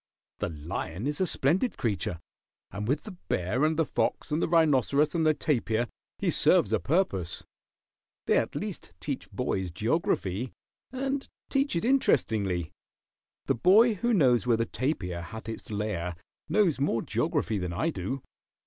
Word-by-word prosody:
The - - -1
lion 80 - -5
is 145 +4 -1
a 185 - +3
splendid 175 - +1
creature, 105 -9 -1 0.5
and 105 +2 -4
with 145 +4 0
the 210 - -9
bear 95 +10 0
and 155 0 +2
the 165 - +3
fox - - -1
and 155 +3 +1
the - - +2
rhinoceros 150 -3 +3
and 165 -2 +2
the 155 - +4
tapir 120 -6 0 0.3
he - - 0
serves - - +4
a - - +3
purpose. 100 - 0 0.8
They - - +4
at - - -3
least - - -5
teach - - -4
boys 95 -2 -1
geography, 110 - -1 0.4
and 270 +1 -2 0.2
teach 275 -6 +1
it 170 - 0
interestingly. 100 - +2 0.7
The - - +2
boy 210 - +5
who 235 +4 0
knows 125 - +4
where 115 -2 +4
the 115 - +1
tapir 95 - -2
hath 110 +7 -8
its 115 - -7
lair 100 -5 -2 0.3
knows 190 -10 +3
more 135 -5 +1
geography 105 -2 0
than 90 -1 -3
I 160 - 0
do. 135 -3 -4
130 Hz, 160 wpm, -28 LUFS, 100-165 Hz, 0.8 s, boy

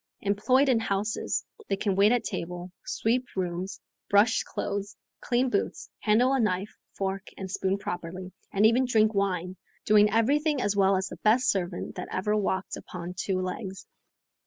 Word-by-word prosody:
Employed 235 +7 +3
in 250 -4 +4
houses, 210 0 -1 0.2
they - - +2
can 195 -1 -1
wait 200 +3 +5
at 245 -1 +2
table, 175 +1 -5
sweep 245 +3 0
rooms, 185 0 -3 0.3
brush 205 +3 +4
clothes, 205 0 -4 0.2
clean 245 +1 +1
boots, 200 - -2
handle 235 +5 +3
a 270 - +2
knife, 200 -2 0 0.2
fork, 195 0 -2
and 190 -1 -6
spoon 190 0 0
properly, 180 -1 -6 0.2
and 200 +2 +3
even 240 +4 +5
drink 220 -3 +3
wine... 185 -2 -1 0.3
doing 210 0 +6
everything 280 +7 +2
as 205 -4 0
well 195 -1 +4
as 190 0 -2
the - - -8
best 235 +4 +3
servant 180 -2 -3
that - - -4
ever 210 +3 0
walked 190 -2 -1
upon 180 0 -7
two 190 0 -1
legs. 185 +1 -5
200 Hz, 160 wpm, -27 LUFS, 190-225 Hz, 0.3 s, doing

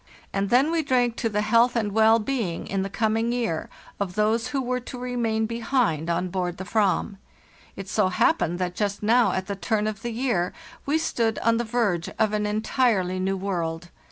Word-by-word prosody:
And 195 0 0
then 265 +7 +4
we 335 -1 +2
drank 250 -5 +1
to 230 - 0
the 210 0 0
health 230 +3 +3
and 215 -3 0
well 220 +2 +5
being 225 -7 -2
in 195 -1 -2
the 195 - -3
coming 225 +3 0
year 230 -10 -2 0.3
of 190 -3 -3
those 220 +3 +1
who 270 +2 -2
were 250 -1 -1
to 250 +1 -8
re 250 0 -4
main 220 -2 0
behind 230 - 0
on 175 +2 0
board 180 -1 -2
the 190 - -6
fram. 200 -1 0 0.6
It 195 0 -7
so 210 0 +2
happened 185 - +1
that 180 -1 -2
Just 205 +1 -2
now 235 +3 +4
at 190 - -2
the 200 - -4
turn 210 +2 -1
of 215 -2 -3
the 240 - -3
year 230 -7 -1 0.3
we 295 +3 +3
stood 230 -8 0
on 230 0 +3
the 235 - 0
verge 215 -8 0
of 215 -1 +2
an 210 0 0
entirely 210 -3 +1
new 190 +1 0
world. 175 -3 -3
215 Hz, 205 wpm, -25 LUFS, 190-235 Hz, 0.6 s, well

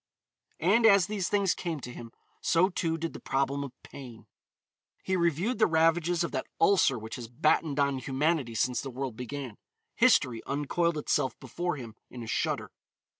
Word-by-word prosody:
And, 215 +7 +4
as 200 -4 +6
these 200 -3 -2
things 200 -3 +2
came 170 -4 -4
to 125 0 -7
him, 115 -1 -9 0.3
so, 180 +2 +3
too, 165 -3 -1
did 165 0 -4
the - - -8
problem 140 +1 -1
of 140 - -7
pain. 120 -6 -11 0.8
He 190 - 0
reviewed 175 - 0
the 215 - +5
ravages 165 +1 +2
of 170 - -3
that - - -3
ulcer 180 -10 +4
which 110 +4 -7
has 120 -2 -7
battened 145 +4 +1
on 140 -1 +1
humanity 135 -1 0
since 120 +2 0
the 140 - -6
world 130 -2 -5
began. 125 -1 -6 0.4
History 145 - +3
uncoiled 155 +4 0
itself 140 -4 0
before 175 +7 -3
him 115 -4 -8 0.2
in 120 -2 -8
a - - -8
shudder. - - -1
150 Hz, 175 wpm, -29 LUFS, 125-175 Hz, 0.8 s, as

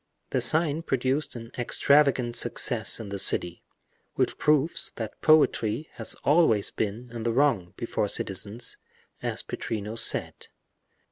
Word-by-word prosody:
The 130 - +1
sign 155 +5 +1
produced 135 -1 -1
an 115 0 -9
extravagant 130 -1 +2
success 120 -1 +1
in 110 -3 -7
the 100 0 -4
city, 90 -2 +1 0.5
which - - -1
proves 150 +1 +2
that 110 -2 -7
poetry 155 -3 +3
has 115 - -4
always 145 -9 +3
been 110 +4 -4
in 115 - -5
the 115 +1 0
wrong, 115 -9 +1
before 115 -2 -2
citizens, 100 +4 -3 0.4
as - - -3
Pittrino 105 0 -5
said. 115 - +1
120 Hz, 130 wpm, -26 LUFS, 110-145 Hz, 0.5 s, poetry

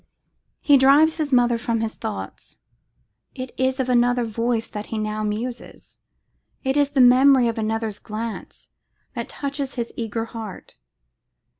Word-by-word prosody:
He 285 -2 +5
drives 290 +5 +5
his 305 -3 -2
mother 240 -2 +3
from 230 -1 -1
his 225 -1 -2
thoughts. 220 -2 -7 0.8
It 255 -1 -6
is 260 +1 0
of 260 - 0
another 245 0 +2
voice 230 +1 -1
that 210 0 -7
he 225 - -4
now 215 0 -2
muses; 230 +4 -5 0.7
it 265 +1 0
is 290 -1 +3
the 280 -2 +2
memory 255 0 +6
of 230 0 -2
another's 220 -1 -2
glance 220 +1 -7 0.4
that - - -5
touches 280 -1 -4
his 235 -2 -4
eager 225 0 -3
heart. 225 -4 -9
240 Hz, 145 wpm, -22 LUFS, 225-265 Hz, 0.8 s, memory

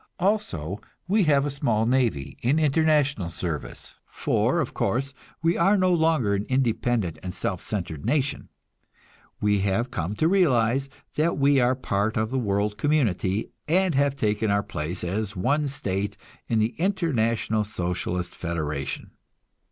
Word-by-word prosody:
Also, 105 - -1 0.3
we 200 0 +3
have 140 -2 +3
a 145 - -1
small 120 -6 +1
navy 120 - 0
in 130 +6 +2
international 150 - +2
service; 85 -3 -5
for, - - 0
of - - -2
course, 135 +3 -1 0.3
we 165 +1 +3
are 195 +5 +4
no 185 -1 +3
longer 160 -10 +2
an 100 0 0
independent 120 -7 0
and 90 0 -6
self 95 0 -2
centered 85 -8 -4
nation; 140 -2 0 0.9
we 105 -1 +2
have 100 +6 0
come 90 +2 -3
to 155 - +2
realize 135 -8 +3 0.3
that 160 +3 +2
we 140 0 +4
are 125 +1 +3
part 110 -3 -1
of 110 +1 0
the 135 - 0
world 105 -2 -1
community, 110 - +1 0.2
and 185 +2 +3
have 140 0 +2
taken 105 -3 0
our 100 0 +2
place 80 +2 -4
as 100 +4 -2
one 140 +11 +1
state 100 -6 -2 0.3
in 115 - +1
the 110 +2 +1
International 115 - +1
Socialist 90 -2 -3
Federation. 75 -4 -4
115 Hz, 145 wpm, -25 LUFS, 100-145 Hz, 0.9 s, are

